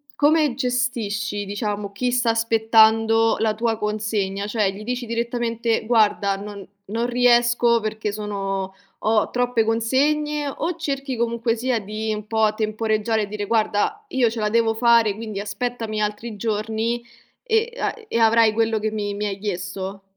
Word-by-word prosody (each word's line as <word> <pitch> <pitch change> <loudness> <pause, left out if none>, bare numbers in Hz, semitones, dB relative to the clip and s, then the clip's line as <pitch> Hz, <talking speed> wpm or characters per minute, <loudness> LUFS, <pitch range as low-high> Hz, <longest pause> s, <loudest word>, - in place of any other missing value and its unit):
come 300 -1 +3
gestisci 235 -5 -1
diciamo 205 0 -3
chi 245 +5 -1
sta 245 -1 +1
aspettando 225 0 +4
la 220 -1 +1
tua 225 0 0
consegna, 210 -2 -2
cioè 210 -2 +1
gli 200 +2 -9
dici 250 +1 -3
direttamente: 235 -1 -1
"Guarda 210 -3 +2
non 200 -1 -8 0.2
non 230 +4 -2
riesco 240 -1 +3
perché 215 -1 -3
sono 195 -2 -3 0.3
ho 215 0 +2
troppe 245 -2 +1
consegne," 290 +6 +1
o 320 +5 -3
cerchi 275 -5 -3
comunque 235 0 0
sia 245 0 0
di 215 +2 -3
un 210 -1 -5
po' 220 -1 +2
temporeggiare 215 0 0
e - - -4
dire: 205 0 -4
"Guarda, 225 - 0
io 260 -8 +2
ce 225 +1 -5
la 210 -1 0
devo 225 0 +2
fare, 230 -2 +4
quindi 215 -1 -5
aspettami 220 +1 -3
altri 210 +1 -3
giorni 225 +2 -2 0.4
e 460 0 +1
a - - -1
e 230 - -2
avrai 225 -1 +5
quello 225 0 +1
che 215 +1 -2
mi 205 -1 -3
mi 205 +1 -3
hai 200 -2 -3
chiesto." 195 0 -5
225 Hz, 155 wpm, -22 LUFS, 210-240 Hz, 0.4 s, avrai